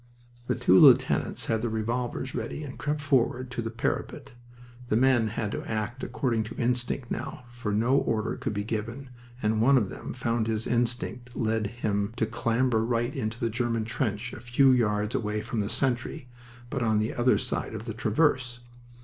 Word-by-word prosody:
The 125 - +1
two 95 -3 +5
lieutenants - - +5
had 110 -1 0
their 120 - -1
revolvers 120 +4 -2
ready 150 - -4
and 135 -2 -8
crept 150 0 -1
forward 130 -3 +1
to 125 - -2
the 115 - -3
parapet. 115 +1 -3 0.6
The 110 - +3
men 125 -2 +4
had 110 -1 -3
to - - -4
act 115 +4 -3
according 115 -4 0
to 115 - -8
instinct 120 +1 -1
now, - - -4
for 120 -3 -4
no 115 +6 +3
order 110 -5 0
could 115 -5 -3
be 105 - -1
given, 115 +5 -4 0.3
and 110 0 +2
one 135 +4 +6
of 105 -6 +1
them - - -7
found 115 -2 -1
his 110 0 -1
instinct 120 0 -1
led 110 -2 0
him 105 -2 -2
to 110 - +2
clamber 115 +1 +1
right 120 +2 0
into 110 -3 -3
the 115 -1 0
German 115 -1 -1
trench 115 0 -2
a - - -7
few 120 +3 +4
yards 105 -3 +1
away 105 -1 -1
from 115 - -3
the 100 -1 -1
sentry, 130 +3 -1 0.4
but - - -2
on 110 -2 +2
the 110 +1 0
other 120 +1 +3
side - - -3
of 110 +1 -6
the 115 - -4
traverse. 120 +1 +1
115 Hz, 185 wpm, -27 LUFS, 110-125 Hz, 0.6 s, one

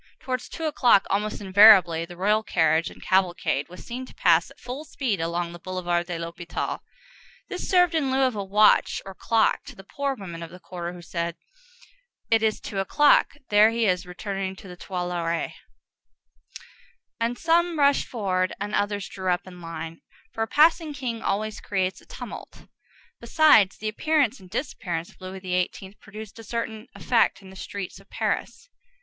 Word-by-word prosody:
Towards 255 -1 -4
two 325 - -7
o'clock, 245 -9 +4
almost 210 +2 -1
invariably, 190 -4 +7
the 175 +1 -12
royal 210 +4 +2
carriage 165 -5 +2
and - - -14
cavalcade 175 -6 +1
was 180 - -12
seen 250 +2 -5
to - - -15
pass 170 -1 +3
at - - -18
full 255 +5 -6
speed 250 - -2
along 170 +1 -2
the 175 - -10
Boulevard 175 -1 -2
de 175 -2 -3
l'Hôpital. 170 +1 -4 0.7
This 370 - -5
served 355 -2 +4
in 300 -5 +1
lieu 265 +1 +2
of 255 -3 +1
a 200 - -2
watch 210 +2 +4
or 195 - -8
clock 225 +3 +1
to - - -10
the 195 - -12
poor 280 +7 -3
women 175 -7 -8
of 165 - -7
the 180 - -12
quarter 175 -1 -6
who 175 -1 -11
said, 170 0 -3 1.0
"It 225 -1 +5
is 220 -1 +1
two 200 - -5
o'clock; 290 +10 +4 0.2
there 210 +1 +6
he 230 0 0
is 180 -2 0
returning 190 +1 -4
to 195 - -13
the 180 - -9
Tuileries." 175 -2 -3 1.7
And 235 +1 -1
some 335 +1 +2
rushed 280 -1 +3
forward, 185 -5 -1
and 205 +1 -4
others 205 -1 -1
drew 190 -1 -4
up 180 +2 -1
in 180 -1 -12
line, 165 0 -7 0.3
for 225 - -4
a 225 - +1
passing 315 +2 +3
king 240 -5 -4
always 215 +1 -2
creates 190 -2 -2
a - - -22
tumult; - - -9 0.5
besides, 265 -12 +5
the 215 - -3
appearance 280 +1 +1
and 185 - -15
disappearance 175 - -4
of - - -25
Louis 185 0 -7
XVIII. 185 +1 -2
produced 215 +1 -10
a - - -9
certain 225 0 -4
effect 230 -4 +1
in 190 - -12
the - - -13
streets 195 0 -6
of - - -21
Paris. - - -3
195 Hz, 180 wpm, -25 LUFS, 180-230 Hz, 1.7 s, invariably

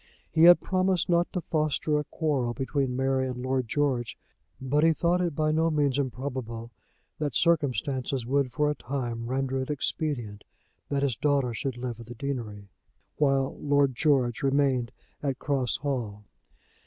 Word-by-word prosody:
He 160 0 +5
had 175 0 +9
promised 185 -2 +1
not 175 0 +2
to 180 - -2
foster 155 -1 0
a - - -2
quarrel 135 -6 -1
between 135 0 -1
Mary 135 0 +1
and 125 -1 -4
Lord 130 -1 0
George, 130 -4 -1 0.4
but 140 +3 +1
he 165 0 +5
thought 175 +3 +1
it 170 -4 -1
by 155 0 +1
no 160 +1 +2
means 145 -3 +1
improbable 125 -3 -4 0.5
that 150 -2 -2
circumstances 135 -5 +1
would 135 0 +1
for 150 +1 +1
a - - 0
time 120 -4 -4
render 130 +1 -1
it 130 - -5
expedient 135 -7 -2 0.5
that 140 -1 0
his 135 -4 +1
daughter 140 -2 +1
should 130 +2 -3
live 120 -2 -5
at 115 - -10
the 120 - -8
deanery, 115 -6 -5 0.5
while 135 -2 +2
Lord 145 -2 +2
George 125 -4 +2
remained 135 -3 +1 0.3
at 135 -3 -1
Cross 135 -4 0
Hall. 120 -8 -3
135 Hz, 160 wpm, -27 LUFS, 125-150 Hz, 0.5 s, had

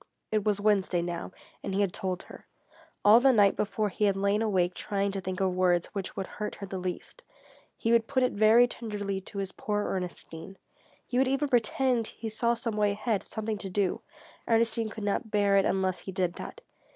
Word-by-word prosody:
It 215 -1 +1
was 205 -1 +1
Wednesday 195 -4 +2
now, 175 +1 -4 0.3
and 195 - -3
he 200 - +2
had 195 -3 0
told 185 -1 -3
her. - - -14 0.6
All 215 +3 +8
the 265 +2 +5
night 205 -5 +4
before 210 0 -1
he 210 +2 0
had 200 -1 +2
lain 200 +2 +1
awake 185 -5 +1
trying 200 +1 -1
to 195 0 -4
think 185 0 -4
of 190 -1 +1
words 180 -1 +2
which 195 -3 -5
would 195 - -3
hurt 210 +2 -5
her 200 - -7
the 190 -1 -5
least. 180 - -6 0.6
He 230 - 0
would 230 -1 +3
put 260 -2 +1
it 250 - +2
very 220 +4 +6
tenderly 205 -5 -4
to 200 - -9
his 195 -1 -2
poor 210 -1 -2
Ernestine. 180 0 -6 0.5
He 250 - -1
would 265 - +3
even 275 +2 0
pretend 245 -1 +2
he 225 - -6
saw 235 +2 +1
some 230 -2 -3
way 205 -1 +2
ahead, 215 0 -1
something 220 -1 -4
to 195 - -5
do. 190 0 0 0.5
Ernestine 230 0 +2
could 215 -1 -7
not 205 +3 -1
bear 205 -1 +2
it 195 - +4
unless 190 -1 0
he 190 - -7
did 180 -2 -1
that. 475 - -9
205 Hz, 210 wpm, -28 LUFS, 190-225 Hz, 0.6 s, All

